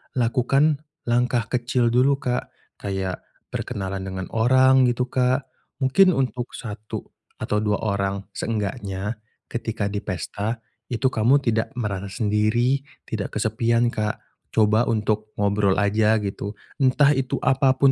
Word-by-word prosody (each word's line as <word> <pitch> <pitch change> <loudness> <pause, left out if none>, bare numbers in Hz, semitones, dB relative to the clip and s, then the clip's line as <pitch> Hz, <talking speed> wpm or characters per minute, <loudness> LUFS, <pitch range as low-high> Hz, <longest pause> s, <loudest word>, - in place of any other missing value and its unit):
lakukan 135 +4 +2 0.2
langkah 120 -1 +1
kecil 125 0 +1
dulu 130 +4 +4
Kak. 125 0 -1 0.3
Kayak 95 -2 -4 0.2
berkenalan 95 -1 -4
dengan 95 -1 -4
orang, 130 +3 +5
gitu 120 +1 +1
Kak. 130 +1 +2 0.4
Mungkin 185 +7 +5
untuk 125 -2 -2
1 105 -2 -6 0.4
atau 105 - 0
2 105 -1 0
orang. 100 -2 -1
Seenggaknya 105 -1 -3 0.3
ketika 110 -3 -2
di 100 - -2
pesta 105 +3 -4 0.3
itu 130 +2 +1
kamu 125 +6 +3
tidak 115 +1 0
merasa 100 -5 -3
sendiri, 110 +5 +1 0.2
tidak 105 -3 -4
kesepian 115 +2 +1
Kak, 110 0 -2 0.3
coba 110 +2 +4
untuk 110 -1 -1
ngobrol 100 -1 +2
aja 105 +2 +3
gitu. 100 +1 -4 0.2
Entah 140 +2 +5
itu 135 -3 0
apapun 135 0 +4
115 Hz, 125 wpm, -23 LUFS, 105-125 Hz, 0.4 s, orang